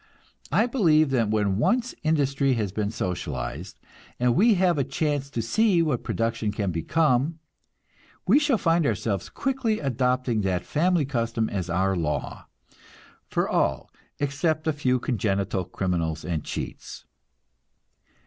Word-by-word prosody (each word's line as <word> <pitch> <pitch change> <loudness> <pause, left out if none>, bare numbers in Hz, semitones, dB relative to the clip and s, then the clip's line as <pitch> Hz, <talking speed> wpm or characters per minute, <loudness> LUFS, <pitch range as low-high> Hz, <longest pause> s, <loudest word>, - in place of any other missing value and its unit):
I 225 - +4
believe 160 - +3
that 115 -5 +1
when 105 -3 +1
once 245 - +1
industry 140 -3 +1
has 105 -5 -2
been 105 +1 -2
socialized, 90 - -4 0.4
and 125 0 +3
we 220 - +5
have 180 -4 +2
a - - +3
chance 140 0 -2
to 120 -5 -3
see 190 - +3
what 145 -7 0
production 115 -2 -1
can 100 -2 -2
become, 140 - +1 0.9
we 215 +10 +5
shall 295 -5 +2
find 165 -5 +2
ourselves 100 -3 -2
quickly 260 -5 -1
adopting 125 -3 0
that 90 -3 -1
family 170 0 +1
custom 115 -4 -1
as 95 -3 -3
our 95 +3 +1
law, 80 -4 -3 0.8
for - - 0
all - - 0 0.3
except 150 +3 0
a 160 - +1
few 130 -3 +1
congenital 100 -5 -1
criminals 85 -4 -2
and 80 -4 -2
cheats. - - -6
125 Hz, 135 wpm, -25 LUFS, 100-160 Hz, 0.9 s, we